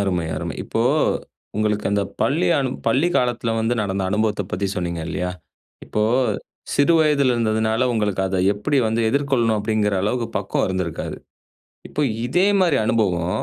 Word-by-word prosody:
அருமை 90 Hz, -4 st, 0 dB
அருமை. -, -, -4 dB
இப்போ -, -, -1 dB, 0.7 s
உங்களுக்கு 105 Hz, -1 st, 0 dB
அந்த 100 Hz, 0 st, +1 dB, 0.2 s
பள்ளி 160 Hz, +6 st, +2 dB
அனு 135 Hz, -2 st, 0 dB, 0.2 s
பள்ளி 155 Hz, +7 st, +3 dB
காலத்ல 120 Hz, -2 st, 0 dB
வந்து 115 Hz, +2 st, +1 dB
நடந்த 95 Hz, -1 st, -2 dB
அனுபவத்த 105 Hz, 0 st, 0 dB
பத்தி 100 Hz, +2 st, -1 dB
சொன்னீங்க 85 Hz, -2 st, -2 dB
இல்லையா? 90 Hz, +1 st, -2 dB, 0.5 s
இப்போ 105 Hz, -, -1 dB, 0.7 s
சிறு 145 Hz, +4 st, +4 dB
வயதிலருந்ததுனால 120 Hz, -7 st, +2 dB
உங்களுக்கு 105 Hz, -4 st, 0 dB
அத 95 Hz, 0 st, -2 dB, 0.2 s
எப்புடி 135 Hz, +8 st, 0 dB
வந்து 110 Hz, +1 st, 0 dB
எதிர்கொள்ளணும்? 130 Hz, -5 st, +1 dB
அப்டிங்கிற 105 Hz, -1 st, 0 dB
அளவுக்கு 115 Hz, +3 st, 0 dB
பக்குவம் 100 Hz, 0 st, -1 dB
இருந்திருக்காது. 95 Hz, -3 st, -3 dB, 0.7 s
இப்போ 150 Hz, -, -2 dB, 0.2 s
இதே 180 Hz, +10 st, +2 dB
மாரி 175 Hz, -6 st, +3 dB
அனுபவம் 90 Hz, -6 st, 0 dB
110 Hz, 140 wpm, -21 LUFS, 100-130 Hz, 0.7 s, சிறு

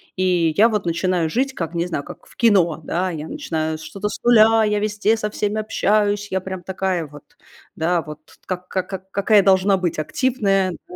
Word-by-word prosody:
и 180 Hz, -3 st, +1 dB
я 225 Hz, +3 st, +6 dB
вот 210 Hz, -4 st, -2 dB
начинаю 170 Hz, -1 st, 0 dB
жить, 265 Hz, +9 st, -1 dB
как, 170 Hz, -6 st, -5 dB
не 170 Hz, +1 st, 0 dB
знаю, 160 Hz, -5 st, -3 dB
как 175 Hz, +2 st, -12 dB
в -, -, -20 dB
кино, 185 Hz, -9 st, +3 dB
да, 180 Hz, +1 st, -1 dB
я 155 Hz, -1 st, -6 dB
начинаю 160 Hz, -, -3 dB
что-то 200 Hz, +5 st, -5 dB
с -, -, -7 dB
нуля, 225 Hz, -1 st, +5 dB
я 210 Hz, -1 st, +1 dB
везде 210 Hz, +1 st, +1 dB
со 210 Hz, -1 st, -2 dB
всеми 210 Hz, +1 st, -2 dB
общаюсь, 205 Hz, -1 st, 0 dB
я 190 Hz, -, 0 dB
прям 190 Hz, -1 st, -7 dB
такая 185 Hz, -2 st, -2 dB
вот, 145 Hz, -1 st, -16 dB, 0.4 s
да 170 Hz, +2 st, 0 dB
вот, 150 Hz, -1 st, -9 dB, 0.3 s
как 180 Hz, -1 st, -4 dB
как 185 Hz, -1 st, -3 dB
как 190 Hz, 0 st, -8 dB
какая 200 Hz, 0 st, +3 dB
должна 195 Hz, 0 st, +4 dB
быть 175 Hz, -4 st, -2 dB
активная. 195 Hz, -, 0 dB, 0.2 s
Да. 180 Hz, -, -11 dB
190 Hz, 195 wpm, -21 LUFS, 170-210 Hz, 0.4 s, я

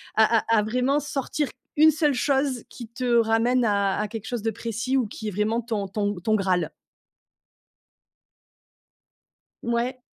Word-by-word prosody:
à 220 Hz, +1 st, +5 dB
à 230 Hz, +1 st, +1 dB
à -, -, +1 dB
vraiment 250 Hz, +6 st, +1 dB
sortir 290 Hz, +1 st, -2 dB, 0.3 s
1 310 Hz, +1 st, +7 dB
seule 300 Hz, -1 st, +1 dB
chose, 270 Hz, -1 st, 0 dB
qui 235 Hz, -3 st, -10 dB
te 250 Hz, +2 st, -5 dB
ramène 230 Hz, +3 st, +2 dB
à 200 Hz, -2 st, +1 dB
à 210 Hz, -, -1 dB
quelque 220 Hz, -2 st, -7 dB
chose 240 Hz, -3 st, -3 dB
de 225 Hz, -, 0 dB
précis, 230 Hz, +4 st, -2 dB
ou 250 Hz, -4 st, +1 dB
qui 215 Hz, +1 st, -6 dB
est -, -, -6 dB
vraiment 215 Hz, +4 st, 0 dB
ton 215 Hz, -4 st, -3 dB
ton 205 Hz, +1 st, -2 dB
ton 215 Hz, +5 st, +1 dB
graal? 185 Hz, -5 st, 0 dB, 2.9 s
Ouais. 240 Hz, +2 st, -1 dB
230 Hz, 155 wpm, -25 LUFS, 210-255 Hz, 2.9 s, 1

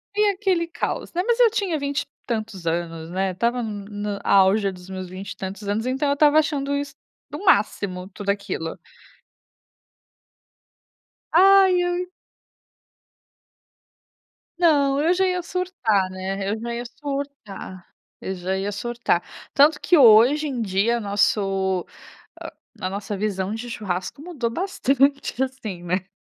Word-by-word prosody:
E 420 Hz, 0 st, +4 dB
aquele 370 Hz, -4 st, 0 dB
caos, 335 Hz, -, -4 dB
né, 355 Hz, -, +1 dB
mas 475 Hz, +1 st, +1 dB
eu 475 Hz, -2 st, +7 dB
tinha 390 Hz, -7 st, -1 dB
20 280 Hz, 0 st, -1 dB
e -, -, -28 dB, 0.2 s
tantos 215 Hz, -6 st, -4 dB
anos, 165 Hz, -1 st, -3 dB
né, 190 Hz, +1 st, -1 dB
estava 235 Hz, +6 st, 0 dB
n 210 Hz, -3 st, -5 dB
no 205 Hz, -1 st, -4 dB
auge 195 Hz, +1 st, +4 dB
dos 180 Hz, 0 st, -13 dB
meus 185 Hz, -1 st, -6 dB
20 190 Hz, +2 st, -7 dB
e -, -, -8 dB
tantos 195 Hz, +2 st, -6 dB
anos, 215 Hz, +3 st, -1 dB
então 265 Hz, +3 st, 0 dB
eu -, -, +3 dB
estava 300 Hz, +1 st, +5 dB
achando 285 Hz, -2 st, -1 dB
isso 285 Hz, 0 st, -3 dB, 0.4 s
o -, -, -6 dB
máximo, 195 Hz, -, +2 dB
tudo 200 Hz, 0 st, -6 dB
aquilo. 200 Hz, -5 st, -2 dB, 2.5 s
Ai, 380 Hz, +1 st, +6 dB
eu 355 Hz, +1 st, -1 dB, 2.5 s
Não, 285 Hz, -5 st, +3 dB
eu 330 Hz, +4 st, +3 dB
já 380 Hz, +1 st, +2 dB
ia 360 Hz, -1 st, -1 dB
surtar, 335 Hz, -, 0 dB
né, 190 Hz, +1 st, -4 dB
eu 220 Hz, -, -2 dB
já 235 Hz, +1 st, -4 dB
ia 235 Hz, +1 st, -4 dB
surtar, 275 Hz, -9 st, -7 dB, 0.3 s
eu 190 Hz, -, -4 dB
já 185 Hz, +1 st, -2 dB
ia 195 Hz, +2 st, -2 dB
surtar. 220 Hz, -3 st, -1 dB, 0.3 s
Tanto 295 Hz, +2 st, +5 dB
que 360 Hz, -, +3 dB
hoje 260 Hz, +3 st, +6 dB
em 250 Hz, -5 st, -2 dB
dia 205 Hz, +5 st, +1 dB
nosso 195 Hz, -3 st, +1 dB, 0.5 s
hã, -, -, -7 dB, 0.3 s
a 185 Hz, -, -1 dB
nossa 200 Hz, +1 st, -4 dB
visão 195 Hz, -1 st, -2 dB
de 240 Hz, +2 st, -6 dB
churrasco 185 Hz, 0 st, -4 dB
mudou 295 Hz, -8 st, -3 dB
bastante 275 Hz, -6 st, +1 dB
assim, 230 Hz, -9 st, -5 dB
né. 180 Hz, +2 st, -2 dB
225 Hz, 145 wpm, -23 LUFS, 195-290 Hz, 2.5 s, eu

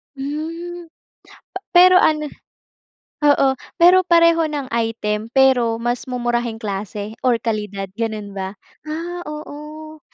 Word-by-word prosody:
Hmm, 330 Hz, +5 st, -5 dB, 0.7 s
pa 375 Hz, -, -3 dB
pero 365 Hz, +1 st, +7 dB
ano 305 Hz, -3 st, +3 dB, 1.0 s
oo. 285 Hz, -1 st, +5 dB, 0.3 s
Pero 365 Hz, +1 st, +7 dB
pareho 335 Hz, -1 st, +4 dB
ng 290 Hz, -4 st, -4 dB
item 225 Hz, -2 st, -2 dB
pero 245 Hz, -4 st, +3 dB
mas 240 Hz, +1 st, -2 dB
mumurahing 240 Hz, -2 st, -2 dB
klase 205 Hz, +2 st, -5 dB
or 240 Hz, -2 st, +2 dB
kalidad 210 Hz, -3 st, -3 dB
gano'n 220 Hz, -3 st, -3 dB
ba? 190 Hz, +1 st, -4 dB, 0.3 s
Ah, 340 Hz, +3 st, -5 dB
oo. 305 Hz, +1 st, -9 dB
265 Hz, 110 wpm, -20 LUFS, 225-315 Hz, 1.0 s, pero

